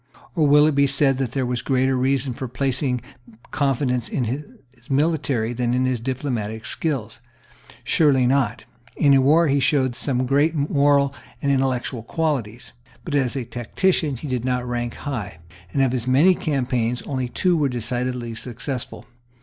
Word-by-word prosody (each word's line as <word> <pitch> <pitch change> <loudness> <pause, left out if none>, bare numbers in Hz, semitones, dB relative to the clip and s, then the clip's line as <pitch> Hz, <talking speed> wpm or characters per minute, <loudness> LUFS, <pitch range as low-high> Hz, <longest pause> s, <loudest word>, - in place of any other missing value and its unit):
Or 160 -5 +2
will 150 +1 +6
it 155 - +2
be 140 0 +3
said 135 -1 +2
that 130 -4 -2
there 135 -2 0
was 125 -1 -2
greater 130 0 +1
reason 130 0 0
for 130 +2 -5
placing 130 0 -1 0.5
confidence 130 -3 0
in 130 - -1
his 125 -1 -8
military 135 -5 0
than 120 0 0
in 130 +1 +1
his 130 -2 0
diplomatic 115 -4 -3
skill? 135 -9 -2 0.7
Surely 140 -5 +3
not. 125 -4 +1 0.3
In 140 -2 +4
war 155 +5 +4
he 140 0 +2
showed 130 -2 +2
some 130 -2 0
great 145 +5 +2
moral 140 -1 +2 0.3
and 140 - 0
intellectual 130 -2 0
qualities; 125 -4 -3 0.3
but, 165 - -5
as 135 -2 +1
a 130 -3 -3
tactician, 135 +6 0
he 150 - -7
did 125 -3 -2
not 125 -1 -1
rank 120 -1 -3
high; 110 - -5 0.3
and 135 - +2
of 130 - +2
his 125 -1 -2
many 145 +9 +5
campaigns 125 -7 -1
only 130 -3 -3
two 180 +7 +1
were 145 -4 +1
decidedly 125 0 -3
successful. 125 +2 -6
130 Hz, 160 wpm, -22 LUFS, 125-140 Hz, 0.7 s, will